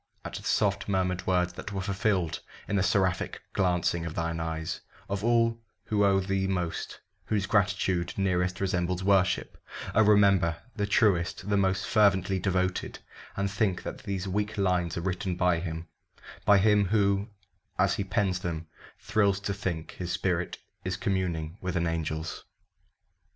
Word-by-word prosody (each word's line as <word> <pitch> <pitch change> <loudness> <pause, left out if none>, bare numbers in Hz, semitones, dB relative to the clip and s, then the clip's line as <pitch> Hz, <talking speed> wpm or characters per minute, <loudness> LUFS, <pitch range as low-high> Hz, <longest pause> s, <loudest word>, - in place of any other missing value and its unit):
At - - -6
the - - -5
soft 100 -1 +1
murmured 90 -2 0
words 90 -1 +2
that 100 - -7
were 100 - -3
fulfilled 100 -3 0 0.3
In 100 - -1
the 100 - +3
seraphic 95 -1 +1
glancing 90 -2 +1
of 85 -1 -5
thine 85 0 -2
eyes 80 -1 -3 0.3
Of 100 0 -3
all 115 0 +2 0.2
who 105 -1 +1
owe 100 -1 +4
thee 95 0 0
most 90 -3 -3 0.3
whose 105 -3 0
gratitude 95 -4 +1
Nearest 90 -1 +1
resembles 90 -1 0
worship 95 -1 +1 0.3
oh, - - +5
remember 100 -5 +4 0.2
The 105 -2 -1
truest 95 -3 +2
the 100 - +3
most 95 -1 +1
fervently 95 -3 +3
devoted, 95 0 -1 0.4
And 100 0 0
think 100 -2 0
that - - -6
these 100 -1 -4
weak 105 +3 -2
lines 90 -4 +1
are - - -1
written 95 0 -2
by 90 -1 +2
him 80 -1 -5 0.6
By 100 - +7
him 105 +1 +4
who, 100 +1 +2 0.5
as - - +3
he - - -1
pens 95 -1 0
them, 85 -3 -4 0.3
thrills 100 -2 +2
to 100 - -2
think 90 -5 -4
His 90 -1 -5
spirit 90 -2 -1 0.3
is 90 0 -2
communing 90 -3 -2
with 90 -1 -3
an 85 0 +1
angel's. 80 -1 -3
95 Hz, 155 wpm, -28 LUFS, 90-100 Hz, 0.6 s, By